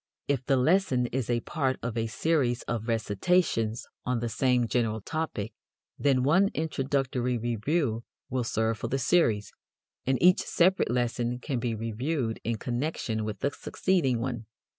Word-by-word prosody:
If 140 -3 0
the 135 - +4
lesson 130 -3 +3
is 130 -2 -2
a 120 -1 +1
part 135 -3 -1
of 120 -1 -3
a 115 -1 0
series 125 -1 +1
of 115 -1 -3
recitations 115 - +1 0.2
on 125 0 0
the 120 0 -2
same 125 +1 +2
general 115 -2 0
topic, 145 -5 -3 0.5
then 135 -3 +3
one 185 +9 +4
introductory 135 -5 0
review 120 +2 0 0.2
will 130 -1 -1
serve 110 -1 0
for - - -2
the 135 - 0
series, 125 -7 +2 0.6
and 130 0 +3
each 180 +1 +6
separate 185 - +2
lesson 120 0 0
can 125 0 -3
be 115 -1 -1
reviewed 115 +3 -2
in 115 0 -1
connection 120 -2 -2
with 105 -1 -5
the 140 - +1
succeeding 150 -12 0
one. 120 -2 -4
125 Hz, 155 wpm, -28 LUFS, 115-140 Hz, 0.6 s, each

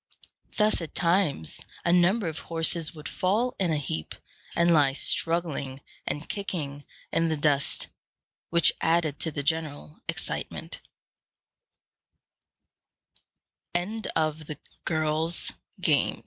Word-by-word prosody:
Thus 210 -3 +3
at 165 - -7
times 170 - +1 0.2
a 170 - +4
number 180 +3 +4
of 160 -1 -4
horses 165 -1 +1
would 150 -1 -7
fall 220 +7 0
in 180 -4 +2
a 155 - +2
heap, 80 - -3 0.4
and 170 0 +4
lie 145 -4 +5
struggling 155 -4 0 0.3
and 145 +1 -3
kicking 150 -8 -4 0.3
in 165 - +3
the 160 -1 0
dust, 145 -1 +2 0.6
which 170 -2 +5
added 165 -3 +2
to 160 - +1
the 145 -2 -4
general 150 - -2
excitement. - - -3
165 Hz, 95 wpm, -27 LUFS, 145-175 Hz, 0.6 s, lie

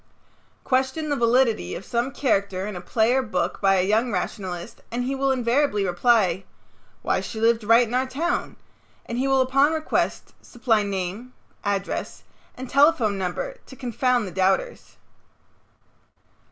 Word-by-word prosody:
Question 265 +4 0
the 290 - +1
validity 235 - +2
of 190 - -8
some 240 +2 -1
character 200 -8 -1
in 210 -2 -5
a 180 - -6
play 220 +5 +1
or 265 - +3
book 215 -8 -2
by 195 0 +4
a 185 -1 +2
young 220 +5 +1
rationalist 180 0 -4
and 240 +1 -2
he 260 +2 -2
will 270 0 +1
invariably 245 -4 +1
reply, 190 -1 +2 0.6
"Why - - 0
she 220 - -6
lived 230 0 +2
right 230 +3 +5
in 230 - -7
our 255 +1 +1
town," 315 +7 -2 0.5
and 235 +1 -4
he 270 - +1
will 270 -1 +3
upon 275 +4 +3
request 315 -1 -2
supply 230 -3 0
name, 200 +5 -4 0.3
address, 200 -1 -3 0.3
and 260 +1 -7
telephone 260 -8 +3
number - - -3
to 265 - -12
confound 250 -2 0
the 185 - -7
doubters. 195 - -1
235 Hz, 155 wpm, -24 LUFS, 200-265 Hz, 0.6 s, right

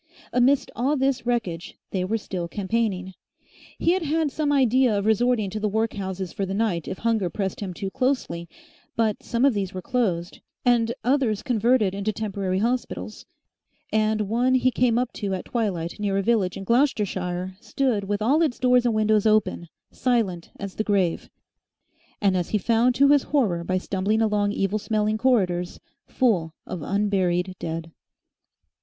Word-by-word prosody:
Amidst 255 +2 +3
all 275 +6 +1
this 265 -2 0
wreckage 195 -9 -2
they 185 -2 -1
were 215 +5 0
still 185 -5 -5
campaigning. 190 -1 -2 0.6
He 335 - +2
had 370 +1 +1
had 315 -1 0
some 295 0 0
idea 255 -4 +3
of 200 - -2
resorting 220 -2 +2
to 215 - -3
the 210 0 0
workhouses 195 -4 -2
for 200 - -3
the 190 0 -2
night 195 -7 0
if 185 - -4
hunger 225 -5 0
pressed 190 +1 -3
him 200 -3 -4
too 190 +2 -5
closely, 250 -11 -1 0.5
but 220 -2 0
some 235 +2 0
of 280 - +4
these 195 -3 -3
were 185 - -4
closed 190 -9 -1 0.3
and 235 -2 +3
others 245 -4 +1
converted 230 -4 +2
into 200 +2 -1
temporary 195 -3 -2
hospitals, 190 - -3 0.7
and 215 0 +2
one 240 +5 +1
he 255 0 +3
came 240 -2 +2
up 250 0 -1
to 200 -3 -2
at 185 - -6
twilight 195 -7 -2
near 200 -2 0
a 195 - 0
village 200 -5 +1
in 195 - -6
Gloucestershire 190 -7 0
stood 230 -2 0
with 205 +1 -1
all 285 +8 +3
its 300 -7 +1
doors 250 -1 +3
and 230 - +1
windows 215 0 +3
open, 215 -5 +1 0.2
silent 220 -9 0
as 200 -1 -5
the 215 - -2
grave, 195 -5 0 0.9
and, 195 -2 +2
as 180 -2 -1
he 215 - +1
found 235 +4 +2
to 280 +2 +5
his 290 -1 +6
horror 205 - +1
by 185 +2 0
stumbling 195 +3 0
along 205 -2 +1
evil 200 +1 0
smelling 215 0 0
corridors, 185 -8 +1 0.3
full 180 - +1
of 180 - -6
unburied 190 -1 0
dead. 165 0 -5
215 Hz, 170 wpm, -24 LUFS, 190-245 Hz, 0.9 s, his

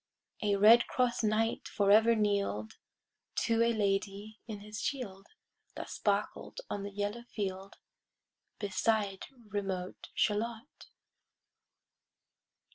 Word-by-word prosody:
[Pg 210 -2 +2
70] - - +4
A - - -2
red 230 +3 +8
cross 250 -2 +1
knight 220 +1 +1
forever 215 +3 +5
kneel'd 200 - 0 0.6
To 230 0 +2
a 235 - +4
lady 205 0 -1
in 210 -3 -6
his 210 +2 -7
shield, 200 -9 -4 0.5
That - - -6
sparkled - - -1
on 200 - -2
the 200 - -4
yellow 205 +3 -3
field, 195 -2 -4 0.8
Beside 205 0 0 0.2
remote 190 -3 -4
Shalott. 225 +5 -1
210 Hz, 110 wpm, -32 LUFS, 200-225 Hz, 0.8 s, red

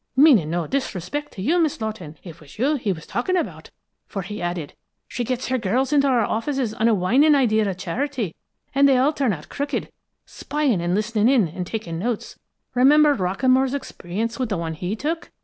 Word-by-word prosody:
Meaning 260 - +6
no 170 0 -1
disrespect 270 - -3
to 185 - -6
you, 335 - +2
Miss 315 -4 +1
Lawton, 215 -9 -5
it 170 -3 -10
was 150 +5 -15
you 270 +7 +2
he 245 -8 -1
was 165 -3 -6
talking 365 +10 -1
about, 345 - -4 0.4
for 195 -3 -4
he 210 +4 -6
added: 175 -4 -3 0.3
'She 245 - -3
gets 250 +2 -3
her 260 0 +1
girls 250 +7 0
into 280 -1 +4
our 245 -5 +3
offices 240 +1 -1
on 225 0 +1
a 230 - +4
whining 255 +12 +4
plea 240 -6 +3
of 200 -4 0
charity, 220 - -3 0.4
and 280 +1 +5
they 265 - +4
all 275 +5 +3
turn 270 -6 +1
out 155 -6 -6
crooked, 285 0 -3 0.3
spying 285 - -1
and 175 +1 0
listening 215 +2 +1
in, 245 -9 +4
and 180 +3 -6
taking 175 -7 -4
notes. 230 +3 -3 0.3
Remember 290 +4 +5
Rockamore's 255 +6 +1
experience 230 -3 -4
with 255 -3 -1
the 200 - -1
one 165 -1 -3
he 180 +6 -3
took? 320 +8 -3
230 Hz, 200 wpm, -23 LUFS, 185-275 Hz, 0.4 s, Meaning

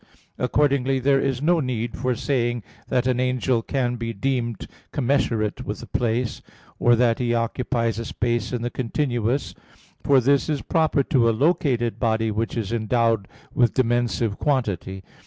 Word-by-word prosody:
Accordingly 135 0 +2
there 135 +1 +3
is 135 0 -1
no 170 +2 +3
need 120 -4 -2
for 125 0 -1
saying 120 -2 -1 0.2
that 125 -1 +1
an 125 -1 +1
angel 125 -1 +1
can 125 0 -1
be 115 0 -4
deemed 120 0 -2 0.3
commensurate 120 -6 0
with - - -5
a - - -7
place, 120 0 -1 0.4
or 120 0 +5
that 115 -1 +2
he 120 -1 +1
occupies 115 -1 -1
a 115 - -4
space 120 +1 -1
in 120 -2 -2
the 120 - -2
continuous; 125 0 -1 0.5
for 140 -2 +5
this 140 +4 +2
is 150 -3 -1
proper 160 -4 +2
to 120 -4 +3
a 110 - 0
located 140 -7 +1
body 110 -2 +1
which 115 +3 -2
is 110 -1 -2
endowed 115 -2 +1 0.3
with 120 -1 +2
dimensive 120 -4 0
quantity. 100 -9 -1
120 Hz, 155 wpm, -23 LUFS, 115-135 Hz, 0.5 s, or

